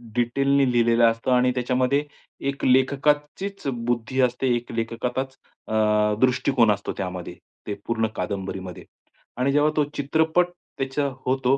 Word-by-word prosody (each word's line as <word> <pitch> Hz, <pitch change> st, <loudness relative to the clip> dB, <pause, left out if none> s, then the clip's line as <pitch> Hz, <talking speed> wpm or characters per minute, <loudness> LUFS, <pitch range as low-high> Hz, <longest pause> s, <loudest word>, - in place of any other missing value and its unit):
डिटेलनी 135 Hz, +2 st, +2 dB
लिहिलेलं 115 Hz, -1 st, +4 dB
असतं 115 Hz, +2 st, +1 dB
आणि 125 Hz, 0 st, +4 dB
त्याच्यामध्ये 125 Hz, +3 st, +1 dB, 0.5 s
एक 140 Hz, -, -4 dB
लेखकाचीच 145 Hz, +8 st, +1 dB
बुद्धी 120 Hz, +1 st, -2 dB
असते, 125 Hz, +1 st, +1 dB
एक 120 Hz, 0 st, -5 dB
लेखकाचाच 125 Hz, +3 st, -3 dB, 0.3 s
अ, -, -, -4 dB, 0.5 s
दृष्टिकोन 125 Hz, -2 st, +3 dB
असतो 100 Hz, -, -2 dB
त्यामध्ये, 90 Hz, -2 st, -5 dB, 0.3 s
ते 105 Hz, -, -2 dB
पूर्ण 115 Hz, -1 st, 0 dB
कादंबरीमध्ये 95 Hz, -2 st, -5 dB, 0.5 s
आणि 130 Hz, +2 st, +1 dB
जेव्हा 145 Hz, +2 st, +3 dB
तो 150 Hz, -, +4 dB
चित्रपट 160 Hz, +5 st, +2 dB, 0.3 s
त्याच 135 Hz, 0 st, -4 dB, 0.3 s
होतो, 130 Hz, +1 st, +2 dB
125 Hz, 125 wpm, -24 LUFS, 115-140 Hz, 0.5 s, लिहिलेलं